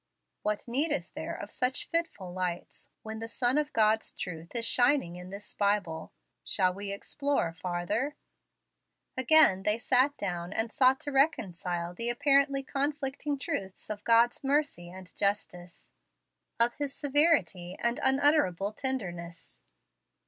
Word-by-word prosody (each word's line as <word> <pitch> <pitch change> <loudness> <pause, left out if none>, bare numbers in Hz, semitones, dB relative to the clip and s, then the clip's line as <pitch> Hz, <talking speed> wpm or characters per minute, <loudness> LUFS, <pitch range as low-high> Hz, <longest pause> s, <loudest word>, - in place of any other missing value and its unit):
What 210 +2 -2
need 280 +7 +1
is 295 - -1
there - - -5
of - - -8
such 250 0 -1
fitful 330 - -2
lights, 180 -1 -4
when 220 0 -6
the 225 - -5
sun 245 +4 +1
of 300 0 -2
God's 220 -2 +2
truth 165 +2 -7
is 230 -1 +1
shining 245 -7 +2
in 180 +1 -9
this 200 +2 -9
Bible? 200 -6 -1 0.3
Shall 180 - +2
we 200 +1 -5
explore 275 - -1
farther?" 180 - -2 1.0
Again 260 -7 +5
they 210 +2 +1
sat 260 +4 +2
down 175 -1 -4
and 225 +1 -1
sought 265 -2 +4
to 290 - -4
reconcile 180 - 0
the 230 +6 -1
apparently 275 +1 +3
conflicting 285 +1 -2
truths 240 - -4
of 205 -1 -6
God's 235 +3 +3
mercy 275 - 0
and 185 0 -11
justice, 180 -4 -3 0.7
of 235 +1 +4
His 285 -2 -3
severity 270 - +2
and 235 0 0
unutterable 265 - +3
tenderness. 175 - -5
225 Hz, 135 wpm, -29 LUFS, 185-275 Hz, 1.0 s, Again